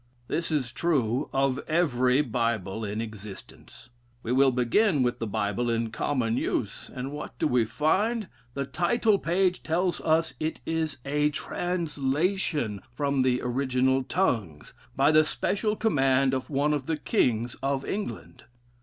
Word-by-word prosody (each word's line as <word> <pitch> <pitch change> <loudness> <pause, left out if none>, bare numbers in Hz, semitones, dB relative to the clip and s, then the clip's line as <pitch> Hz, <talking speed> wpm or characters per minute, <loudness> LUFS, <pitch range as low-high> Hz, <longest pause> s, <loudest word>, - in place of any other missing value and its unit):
This 170 - -1
is 140 -6 -1
true 135 -6 0
of 135 -1 +1
every 135 -5 +3
Bible 115 -5 -1
in 105 +1 -3
existence. 110 +1 -10 0.3
We 115 - -3
will 135 +2 +5
begin 130 - +2
with 125 0 0
the 115 - -2
Bible 105 +4 -1
in 115 -1 0
common 120 -3 0
use, 105 -5 -2
and 130 +2 -4
what 150 +1 -7
do - - 0
we 125 -5 +3
find! 205 - +1 0.3
The 140 0 -1
title 205 - +2
page 180 +1 +1
tells 175 +2 0
us 160 +1 +2
it 160 +1 -2
is 160 -3 -1
a 150 +1 +2
translation 150 - -1
from 140 +1 0
the 125 -1 +1
original 130 +1 +1
tongues, 115 - -1 0.2
by 140 +3 +4
the 155 0 +6
special 210 +6 -1
command 135 - +2
of 130 -1 -2
one 145 +1 +1
of 140 -3 -2
the 160 -1 0
kings 120 -4 0
of 135 0 -1
England. 205 +1 -5
135 Hz, 145 wpm, -27 LUFS, 120-160 Hz, 0.3 s, the